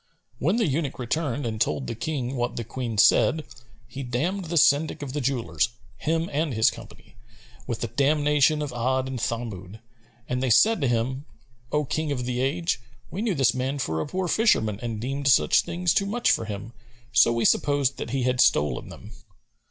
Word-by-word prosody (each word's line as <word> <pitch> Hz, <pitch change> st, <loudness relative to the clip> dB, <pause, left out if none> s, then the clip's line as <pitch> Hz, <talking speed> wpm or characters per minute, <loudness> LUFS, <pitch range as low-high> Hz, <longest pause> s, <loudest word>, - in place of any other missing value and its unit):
When 170 Hz, +9 st, +1 dB
the 230 Hz, -2 st, +2 dB
eunuch 145 Hz, -2 st, -1 dB
returned 140 Hz, +1 st, -2 dB
and 110 Hz, -2 st, -3 dB
told 70 Hz, -3 st, 0 dB
the -, -, -4 dB
King 130 Hz, +1 st, -3 dB
what 120 Hz, -1 st, -2 dB
the 120 Hz, -, -3 dB
Queen 115 Hz, -1 st, -5 dB
said, 155 Hz, +9 st, +4 dB, 0.4 s
he 130 Hz, +3 st, -7 dB
damned 155 Hz, +10 st, -2 dB
the 170 Hz, +1 st, -2 dB
Syndic 145 Hz, 0 st, +3 dB
of 135 Hz, -2 st, -6 dB
the 150 Hz, -, -2 dB
jewellers, 120 Hz, -, 0 dB, 0.3 s
him 165 Hz, +1 st, -1 dB
and 150 Hz, -3 st, -1 dB
his 110 Hz, -, +4 dB
company, -, -, -14 dB, 0.5 s
with 115 Hz, -, -3 dB
the 115 Hz, -, -1 dB
damnation 150 Hz, +3 st, +2 dB
of 145 Hz, -, -4 dB
Бd 130 Hz, +2 st, 0 dB
and 130 Hz, -1 st, -5 dB
Thamъd,[FN#249] 110 Hz, -4 st, -4 dB, 0.5 s
and 125 Hz, 0 st, -2 dB
they 130 Hz, -, 0 dB
said 215 Hz, -, +4 dB
to 135 Hz, -, +2 dB
him, 125 Hz, +4 st, -1 dB, 0.5 s
"O 150 Hz, 0 st, +1 dB
King 155 Hz, +2 st, -2 dB
of 125 Hz, -3 st, -2 dB
the 125 Hz, 0 st, -2 dB
age, 140 Hz, +1 st, -1 dB, 0.3 s
we 195 Hz, -, -4 dB
knew 220 Hz, -5 st, 0 dB
this 130 Hz, -5 st, +3 dB
man 130 Hz, +2 st, -2 dB
for 80 Hz, -, -2 dB
a -, -, -4 dB
poor 185 Hz, +3 st, -2 dB
fisherman 110 Hz, -, +2 dB
and 115 Hz, -3 st, -4 dB
deemed 135 Hz, +4 st, -3 dB
such 75 Hz, -, +5 dB
things 175 Hz, 0 st, -1 dB
too 195 Hz, -, +1 dB
much 235 Hz, +4 st, +1 dB
for 115 Hz, -, 0 dB
him,[FN#250] 105 Hz, +1 st, -6 dB, 0.4 s
so 120 Hz, -1 st, +5 dB
we 115 Hz, -1 st, 0 dB
supposed 145 Hz, -2 st, +2 dB
that -, -, -5 dB
he 130 Hz, +1 st, -1 dB
had 125 Hz, 0 st, +2 dB
stolen 75 Hz, 0 st, +2 dB
them." 105 Hz, -, -11 dB
130 Hz, 195 wpm, -25 LUFS, 115-150 Hz, 0.5 s, such